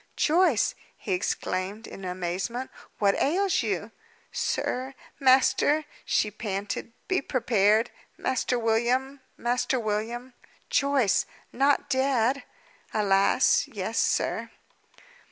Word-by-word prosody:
"Joyce," 325 - +3 0.2
he 195 - -3
exclaimed, 185 +3 -2
in 195 - -10
amazement, 185 +8 -3 0.3
"what 200 -1 +3
ails 365 +5 +2
you?" 205 -1 -2 0.4
"Sir! 260 +2 -2 0.2
master!" 265 +3 +4 0.2
she 210 - +1
panted; 205 +1 -4 0.2
"be 375 -4 +1
prepared. 225 -3 +2 0.3
Master 255 -1 0
William 245 +4 0 0.2
Master 245 +2 0
William 230 +3 -3 0.2
" - - -33
"Joyce! 275 -8 +2 0.3
Not 280 +2 +2
dead!" 265 -1 +1 0.5
"Alas, 195 -2 +3
yes, - - -3
sir!" - - 0
240 Hz, 100 wpm, -27 LUFS, 205-265 Hz, 0.5 s, master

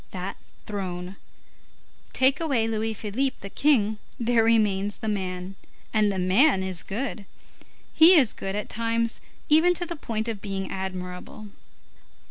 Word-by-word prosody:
That 185 +1 -5 0.3
throne. 185 -2 -5 0.9
Take 260 +1 +3
away 270 -9 +1
Louis 220 0 -2
Philippe 230 +6 -2
the 200 - -8
king, 220 -8 +2 0.2
there 235 -1 +3
remains 205 -3 +2
the 220 - -6
man. 185 -2 -3 0.4
And 215 -2 +3
the 195 - -3
man 190 +5 +3
is 185 -3 -5
good. 220 -1 -5 0.7
He 335 +4 +9
is 265 -9 +5
good 195 0 -5
at 210 - -3
times 230 0 -2 0.3
even 325 +4 +5
to 350 - -2
the 340 0 -5
point 225 -6 -3
of 220 -4 -4
being 195 -2 -4
admirable. 185 +2 -6
215 Hz, 140 wpm, -25 LUFS, 195-235 Hz, 0.9 s, He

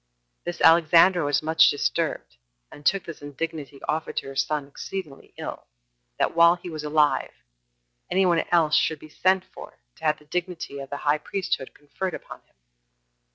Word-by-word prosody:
This 175 0 -5
Alexandra 170 +2 +6
was 145 +1 +1
much 160 +1 +5
disturbed, - - -2 0.3
and 145 - -13
took 195 +5 +2
this 165 -3 -9
indignity 145 -1 -6
offered 155 +1 -2
to - - -2
her 135 - -9
son 150 +1 0
exceeding 150 0 -8
ill, - - -7 0.5
that - - +1
while 170 +1 +6
he 175 0 -9
was 155 -1 -6
alive, 150 0 +2 0.8
any 190 +1 +3
one 170 -2 +3
else 165 -3 +4
should 160 - +2
be 155 - -14
sent 185 +4 +1
for - - -12 0.2
to - - -19
have 155 0 +2
the 150 - -21
dignity 175 -3 -4
of 135 -1 -8
the 145 - -4
high 145 +1 +3
priesthood 180 -6 -3
conferred 160 +5 -5
upon - - -11
him. - - -37
155 Hz, 170 wpm, -25 LUFS, 145-175 Hz, 0.8 s, Alexandra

